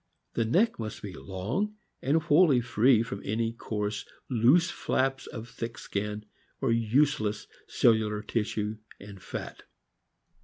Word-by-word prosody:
The 115 - +1
neck 195 - +2
must 110 -1 -5
be 100 -3 -6
long, 115 - -3 0.3
and 145 +5 +3
wholly 155 -4 +5
free 120 0 +4
from 100 -4 -6
any 115 +2 -1
coarse, 105 -2 -3 0.3
loose 130 +8 +4
flaps 135 0 -1
of 115 -1 -7
thick 115 -2 -6
skin 105 +1 -4 0.3
or - - +1
useless 115 -1 +2 0.2
cellular 110 -2 +2
tissue 105 -1 -2 0.2
and 100 -1 -11
fat. - - -7
115 Hz, 125 wpm, -29 LUFS, 105-130 Hz, 0.3 s, wholly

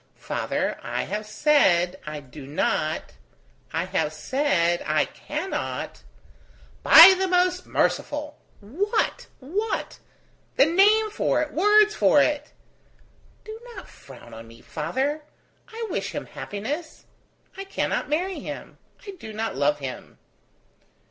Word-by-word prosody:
"Father! - - -3
I - - -3
have 210 0 -5
said 190 - +2
I 150 -1 -5
do 135 0 -12
not... 155 +1 -1 0.6
I 165 +2 -1
have 185 -5 -1
said 175 - 0
I - - +2
cannot.. 385 - -5 0.4
." - - -28
"By 345 +4 +10
the 380 +1 0
most 365 0 +1
merciful! 295 0 -1 0.2
what? 370 - -2
what? 395 +12 -3 0.6
the - - +6
name 415 +6 +4
for 310 - +1
it, 305 - -8
words 420 +4 +4
for - - +4
it!" - - 0 0.9
"Do 435 +1 -9 0.2
not 380 - -10
frown 125 -4 -15
on 115 0 -10
me, 115 0 -16
father. 265 - -2 0.5
I 455 +1 -6
wish - - -3
him - - -4
happiness. 285 +11 -6 0.5
I 390 - -6
cannot 390 - -2
marry 360 +5 -1
him. - - -8 0.3
I 400 - -6
do 220 - -8
not 220 +1 -3
love 145 +2 +1
him." 135 -3 -8
290 Hz, 130 wpm, -24 LUFS, -, 0.9 s, By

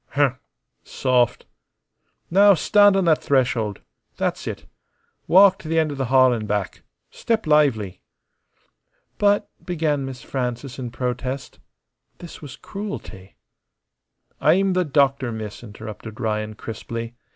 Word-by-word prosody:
Humph. 140 -3 +2 0.4
Soft. 125 -2 0 0.9
Now 200 +2 +6
stand 205 +3 +5
on 190 - +1
that 160 -2 +3
threshold. 125 -6 0 0.4
That's - - -2
it. - - -6 0.6
Walk 195 +1 +6
t' 160 - -9
the' 165 - 0
end 160 -2 +2
o' - - -5
the 135 -1 -2
hall 130 0 +5
an' 110 -3 -4
back. 105 -2 -2 0.3
Step 225 -1 -1
lively." 140 -11 +2 1.2
"But," 205 0 +3 0.2
began 155 -5 -1
Miss 130 -3 -7
Frances 125 0 -4
in 125 -2 -4
protest. 125 +2 -4 0.6
This 175 - -11
was 145 -4 -9
cruelty. 195 - -8 1.0
"I'm 190 +5 +3
the 180 0 +1
doctor, 140 -3 +2
miss," 110 -2 -7
interrupted 110 +1 -9
Ryan, 110 -2 -2
crisply. 115 +1 -6
135 Hz, 125 wpm, -22 LUFS, 115-165 Hz, 1.2 s, Now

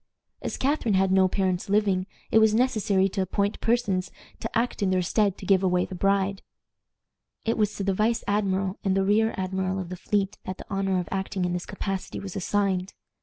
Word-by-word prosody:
As - - -4
Catharine 260 -6 +1
had 190 0 +3
no 190 0 +5
parents 185 -1 -1
living, 195 -2 +2 0.2
it 220 - +6
was 220 -1 +4
necessary 215 -6 +2
to 195 +1 -2
appoint 200 +2 -1
persons 205 -6 +1 0.3
to - - -4
act 235 -1 -1
in 195 - +2
their 185 -1 +2
stead 200 +1 +1
"to - - -9
give 190 -1 +4
away 180 -1 +2
the - - -9
bride." 195 +1 +1 1.0
It 230 - +1
was 210 -1 0
to 200 - -3
the 195 0 +1
vice 220 +4 +1
admiral 195 -1 0
and 195 -1 +1
the 195 - +3
rear 220 +3 +2
admiral 190 0 -1
of 185 -2 -4
the 185 - -5
fleet 195 +1 -1
that 185 0 -5
the - - -10
honor 195 -1 +1
of 175 - -4
acting 190 -1 -2
in 175 - -1
this 180 0 -4
capacity 195 -2 -4
was 195 -1 -7
assigned. 195 -1 0
195 Hz, 205 wpm, -26 LUFS, 185-205 Hz, 1.0 s, it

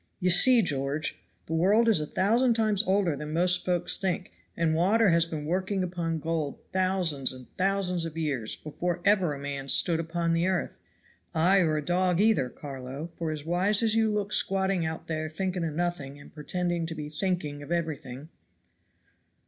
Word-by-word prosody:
You 180 -1 +2
see, 235 +7 +5
George, 145 -1 -2 0.3
the 160 - -5
world 200 +8 +3
is 220 -7 +4
a 150 - -3
thousand 230 - +2
times 215 -3 +2
older 190 -5 +2
than 150 +2 -6
most 180 +2 +2
folks 175 -1 +1
think, 190 0 -2 0.3
and 165 -1 +1
water 200 +6 +3
has 170 -1 +3
been 155 -3 -5
working 185 +3 -1
upon 170 -2 -2
gold 160 -2 -2 0.2
thousands 185 -7 +1
and 130 -1 -9
thousands 185 -2 0
of 165 -1 -6
years 140 -9 -2
before 175 +3 -4
ever 185 -7 +3
a - - -9
man 140 -1 -5
stood 165 +3 +3
upon 165 0 -1
the 165 +2 +1
earth, 185 -2 -2 0.6
ay 180 +5 +4
or 155 -4 +2
a 150 - -4
dog 180 0 +1
either, 205 - +3
Carlo, 135 +4 -8
for 165 -2 -3
as 155 -1 -5
wise 190 +6 +2
as 220 -1 +4
you 220 -1 +2
look 210 0 -1
squatting 190 -3 +1
out 160 0 -5
there 155 -1 -3
thinking 180 +2 -3
of 160 -2 -3
nothing 160 -5 -3
and 145 - -15
pretending 175 +2 -2
to 165 - -5
be 150 -1 -5
thinking 155 -2 -2
of 145 - -10
everything." 155 -4 -4
170 Hz, 180 wpm, -28 LUFS, 155-190 Hz, 0.6 s, see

